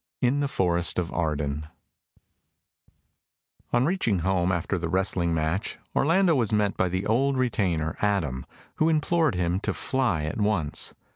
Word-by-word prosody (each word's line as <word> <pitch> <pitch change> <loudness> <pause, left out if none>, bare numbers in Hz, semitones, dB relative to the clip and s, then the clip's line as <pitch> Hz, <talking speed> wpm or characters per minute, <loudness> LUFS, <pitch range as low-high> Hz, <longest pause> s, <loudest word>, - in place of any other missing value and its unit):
In 130 +3 +2
the 145 - +1
Forest 85 -8 0
of 90 -2 -2
Arden 75 -2 -2 2.0
On 120 +1 +3
reaching 130 - +1
home 95 -1 +2
after 90 +1 -1
the 85 -1 -3
wrestling 90 -1 0
match, 80 +5 -1 0.2
Orlando 170 +4 +3
was 120 -8 +1
met 105 -2 +1
by 90 - +1
the 95 +2 -2
old 135 +5 +2
retainer, 90 -10 0
Adam, 85 -12 0 0.3
who 155 - +3
implored 160 - +2
him 90 0 0
to - - -2
fly 120 - 0
at 80 +8 -3
once. 100 -8 0
95 Hz, 145 wpm, -26 LUFS, 85-125 Hz, 2.0 s, On